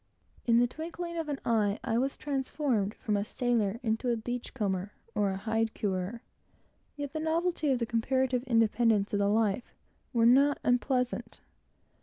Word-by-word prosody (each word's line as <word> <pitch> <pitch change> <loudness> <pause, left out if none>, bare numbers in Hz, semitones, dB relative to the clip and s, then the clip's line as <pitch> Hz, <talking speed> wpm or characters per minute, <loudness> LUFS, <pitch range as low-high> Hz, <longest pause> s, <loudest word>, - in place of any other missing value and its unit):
In 230 -1 +5
the 240 - +5
twinkling 340 +6 -5
of 325 -2 -3
an 285 -2 -2
eye, 215 -3 +2
I 230 +1 +1
was 270 +2 -1
transformed 265 -6 -1
from 215 -4 -1
a 200 - +1
sailor 230 -2 0
into 225 +2 0
a 235 - +1
"beach 245 +3 -5
comber" 200 -3 -2 0.2
and 205 - +2
a 190 -1 0
hide 225 +2 -1
curer; 200 +4 -2 0.7
yet 285 -1 -5
the 315 - -2
novelty 320 0 0
and 265 - +3
the 235 - 0
comparative 250 +2 +1
independence 225 -3 +3
of 205 - +2
the 200 0 +2
life 220 +1 0 0.4
were 230 -2 +3
not 275 +4 +5
unpleasant. 250 0 0
235 Hz, 165 wpm, -30 LUFS, 215-270 Hz, 0.7 s, In